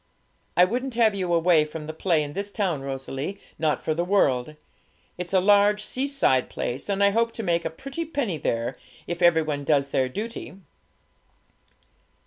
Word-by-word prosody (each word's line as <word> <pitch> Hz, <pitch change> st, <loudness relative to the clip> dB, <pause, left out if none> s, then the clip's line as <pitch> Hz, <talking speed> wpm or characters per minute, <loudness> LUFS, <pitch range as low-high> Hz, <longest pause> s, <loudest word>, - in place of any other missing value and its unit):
'I 180 Hz, -, +8 dB
wouldn't 250 Hz, +5 st, -3 dB
have 225 Hz, -3 st, +4 dB
you 185 Hz, -3 st, -2 dB
away 165 Hz, -2 st, +4 dB
from 150 Hz, 0 st, -7 dB
the 155 Hz, -, -6 dB
play 160 Hz, -1 st, +1 dB
in 145 Hz, 0 st, -6 dB
this 200 Hz, +3 st, -3 dB
town, 185 Hz, -10 st, -1 dB
Rosalie, 135 Hz, +7 st, -5 dB, 0.2 s
not 155 Hz, -1 st, +1 dB
for 155 Hz, -, -1 dB
the 170 Hz, +2 st, -1 dB
world. 155 Hz, -8 st, +1 dB, 0.6 s
It's 180 Hz, 0 st, -6 dB
a 190 Hz, -, +4 dB
large 205 Hz, +2 st, +4 dB
seaside 265 Hz, -, +1 dB
place, 130 Hz, +10 st, -4 dB
and 200 Hz, 0 st, +1 dB
I 200 Hz, -, +5 dB
hope 230 Hz, +2 st, +1 dB
to 225 Hz, -, -5 dB
make 170 Hz, -3 st, 0 dB
a -, -, 0 dB
pretty 275 Hz, -, -6 dB
penny 275 Hz, -, -2 dB
there, 120 Hz, 0 st, -2 dB, 0.3 s
if 175 Hz, +1 st, -5 dB
every 170 Hz, -2 st, +5 dB
one 145 Hz, -2 st, -3 dB
does 140 Hz, -1 st, +2 dB
their 130 Hz, -1 st, +1 dB
duty.' 215 Hz, -, -6 dB
175 Hz, 175 wpm, -25 LUFS, 150-205 Hz, 0.6 s, I